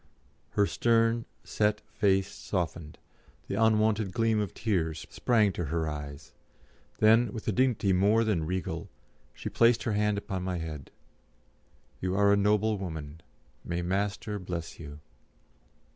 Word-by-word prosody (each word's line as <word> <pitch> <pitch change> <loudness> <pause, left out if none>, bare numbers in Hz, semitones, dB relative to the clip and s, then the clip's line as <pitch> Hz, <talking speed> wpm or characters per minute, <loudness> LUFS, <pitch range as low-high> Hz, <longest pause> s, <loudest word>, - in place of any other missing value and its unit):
Her 100 - +5
stern, 115 +1 +2 0.2
set 105 -1 0
face 100 -2 0
softened, 85 -6 -4 0.5
the - - -4
unwonted 110 -1 +2
gleam 115 -2 +2
of 105 -4 -2
tears 85 -7 -1
sprang 110 -5 +2
to 85 - -3
her 80 +1 -1
eyes; 75 -1 -7 0.6
then, 110 +1 +5
with 110 0 -7
a - - +3
dignity 115 -4 +2
more 105 +5 +4
than 90 -8 0
regal, 95 +1 -3 0.5
she - - -7
placed 115 0 +3
her 110 - -1
hand 105 0 +1
upon 95 -2 -4
my 90 -1 -2
head. 80 -4 -6 1.1
"You 90 0 -1
are 100 0 +4
a - - +5
noble 105 +1 +2
woman. 80 -4 -6 0.4
May 85 0 -3
Master 100 +3 -2
bless 90 -3 -6
you." 75 -2 -9
100 Hz, 140 wpm, -29 LUFS, 85-110 Hz, 1.1 s, Her